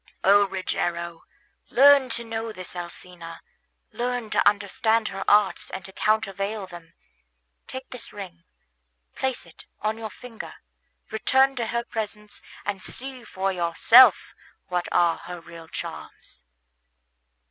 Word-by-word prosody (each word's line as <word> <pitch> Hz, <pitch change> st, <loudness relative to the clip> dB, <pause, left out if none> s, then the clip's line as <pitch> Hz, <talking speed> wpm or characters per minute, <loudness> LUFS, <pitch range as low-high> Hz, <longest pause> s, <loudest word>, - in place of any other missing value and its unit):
O 200 Hz, +1 st, +6 dB
Rogero, 170 Hz, -3 st, -3 dB, 0.4 s
learn 275 Hz, 0 st, +6 dB
to 235 Hz, -, -1 dB
know 225 Hz, 0 st, -4 dB
this 185 Hz, -3 st, -6 dB
Alcina, 175 Hz, -1 st, -6 dB, 0.5 s
learn 245 Hz, -2 st, -3 dB
to -, -, +5 dB
understand 215 Hz, +2 st, 0 dB
her 195 Hz, 0 st, -5 dB
arts 205 Hz, -1 st, +3 dB
and 190 Hz, -2 st, -7 dB
to 190 Hz, -, -10 dB
countervail 210 Hz, -1 st, 0 dB
them. 175 Hz, -2 st, -13 dB, 0.7 s
Take 260 Hz, 0 st, -8 dB
this 250 Hz, -2 st, -6 dB
ring, 180 Hz, -4 st, -9 dB, 0.7 s
place 265 Hz, -6 st, -2 dB
it 170 Hz, -, -16 dB
on 215 Hz, +1 st, -2 dB
your 220 Hz, -1 st, -5 dB
finger, 230 Hz, +2 st, -10 dB, 0.6 s
return 265 Hz, +5 st, +3 dB
to 235 Hz, -2 st, -1 dB
her 235 Hz, +1 st, -1 dB
presence, 210 Hz, -2 st, -6 dB, 0.2 s
and 200 Hz, -2 st, -3 dB
see 260 Hz, +3 st, -5 dB
for 195 Hz, -3 st, -2 dB
yourself 185 Hz, +6 st, +6 dB, 0.4 s
what 180 Hz, -1 st, -1 dB
are 170 Hz, -1 st, +3 dB
her 175 Hz, +1 st, -8 dB
real 165 Hz, 0 st, -12 dB
charms." -, -, -8 dB
205 Hz, 125 wpm, -25 LUFS, 175-230 Hz, 0.7 s, O